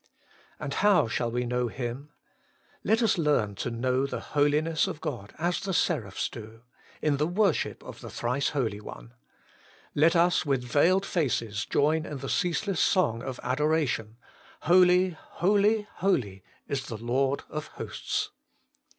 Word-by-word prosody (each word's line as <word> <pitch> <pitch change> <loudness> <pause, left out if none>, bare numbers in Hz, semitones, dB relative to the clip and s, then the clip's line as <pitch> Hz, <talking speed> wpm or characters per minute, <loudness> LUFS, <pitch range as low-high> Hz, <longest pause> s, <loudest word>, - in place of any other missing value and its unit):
And 140 - -4
how 205 - +4
shall 115 +2 -1
we 125 +1 -1
know 125 0 0
Him? 125 +4 -5 0.7
Let 225 +4 +2
us 215 -5 +2
learn 145 -10 +2
to - - -2
know 130 +3 0
the - - -4
Holiness 150 +2 +2
of - - -5
God 120 -11 -5
as 175 +3 0
the 195 -2 -3
seraphs 115 - 0
do: 115 0 -11 0.4
in 150 -2 +2
the 150 +2 +1
worship 190 -1 0
of - - -10
the - - -8
Thrice 125 +4 -1
Holy 115 -8 -2
One. - - -10 0.8
Let 160 +4 +4
us 175 0 +3
with 135 -4 0
veiled 170 +10 +3
faces 115 - -1
join 155 +2 +1
in 150 - -5
the 135 0 -6
ceaseless 180 +1 0
song 135 - +2
of 130 +1 -6
adoration: 130 -5 0 0.2
' - - -25
Holy, 180 +2 +5
holy, 205 +3 +1
holy 120 - 0 0.3
is 135 -1 -3
the 115 - -5
Lord 130 +5 0
of 150 0 -5
hosts.' - - -4
145 Hz, 150 wpm, -28 LUFS, 120-175 Hz, 0.8 s, Holy